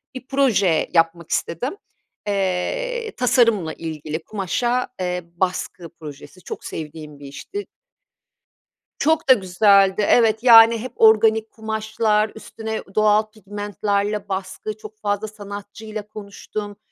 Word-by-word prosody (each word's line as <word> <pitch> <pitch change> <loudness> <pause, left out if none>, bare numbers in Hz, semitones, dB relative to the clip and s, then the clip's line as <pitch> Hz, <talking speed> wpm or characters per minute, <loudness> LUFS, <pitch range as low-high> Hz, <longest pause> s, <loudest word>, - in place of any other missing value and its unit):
bir 255 0 -8
proje 215 - +2
yapmak 165 0 +1
istedim. 250 - -2 0.5
Eee, 440 - -1
tasarımla 230 - +2
ilgili 155 -1 -6
kumaşa, 240 +6 -1
eee, 180 -1 -2
baskı 180 -1 -3
projesi. 155 +2 -12
Çok - - -7
sevdiğim 150 -2 -8
bir 145 - -11
işti 390 - -7 1.3
çok 315 0 +1
da - - +10
güzeldi. 195 -1 +4
Evet, 220 -2 +4
yani 230 -1 +8
hep 245 +2 -7
organik 220 0 +4
kumaşlar 220 -1 -1
üstüne 220 0 -6
ü - - -9
doğal 215 0 +4
pigmentlerle 205 0 -3
baskı. 195 +2 -4
Çok 215 0 -12
fazla 205 0 -2
sanatçıyla 205 +1 -8
konuştum, 205 0 -7
210 Hz, 115 wpm, -21 LUFS, 185-220 Hz, 1.3 s, da